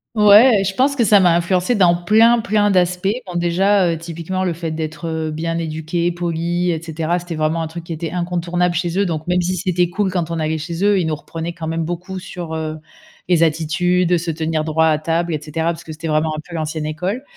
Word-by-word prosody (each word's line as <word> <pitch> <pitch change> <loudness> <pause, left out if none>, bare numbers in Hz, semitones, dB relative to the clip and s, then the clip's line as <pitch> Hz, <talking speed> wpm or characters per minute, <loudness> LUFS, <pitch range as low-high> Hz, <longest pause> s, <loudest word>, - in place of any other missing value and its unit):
Ouais 210 +1 +7
et - - 0
je 195 0 -2
pense 275 +4 +2
que 245 - +2
ça 205 -1 +6
m'a 175 -3 +4
influencé 180 +5 +1
dans 180 -6 +4
plein, 220 +7 +4
plein 210 -2 +1
d'aspects. 180 -1 +1 0.2
Bon, 180 - -8
déjà, 180 +3 +2
heu, 165 - -1
typiquement 170 +3 -4
le 180 -2 0
fait 165 0 -5
d'être, 155 +1 -5
heu, 160 -1 -2
bien 165 +2 -3
éduquée, 165 +1 -2
polie 175 +1 -1
et 165 -2 0
cetera 165 +1 -2
c'était 175 -1 -6
vraiment 155 +1 0
un - - -3
truc 165 +1 -8
qui 170 - -5
était 160 0 -5
incontournable 175 0 -1
chez 175 +2 -1
eux 200 - +2
donc 160 -2 -3
même 180 0 +1
si 180 +1 -1
c'était 180 -1 0
cool 190 +1 -1
quand 175 -3 -2
on 165 - -3
allait 160 0 -1
chez 170 +3 -4
eux, 205 -1 +4
ils 170 - 0
nous 155 - -1
reprenaient 165 +3 -6
quand 165 -1 -7
même 165 +1 -1
beaucoup 175 +3 -5
sur, 175 -3 -7
heu, 155 -1 -3 0.5
les 175 -2 +3
attitudes, 170 +3 +2
se 165 +1 -4
tenir 160 0 -2
droit 160 0 +2
à 155 -1 +3
table 165 +2 -1
et 150 - -3
cetera 155 +2 -3
parce 170 0 -8
que 160 - -9
c'était 160 +1 -6
vraiment 155 0 +1
un - - -5
peu 175 - -11
l'ancienne 155 -1 -3
école 180 - -3
170 Hz, 240 wpm, -19 LUFS, 160-180 Hz, 0.5 s, Ouais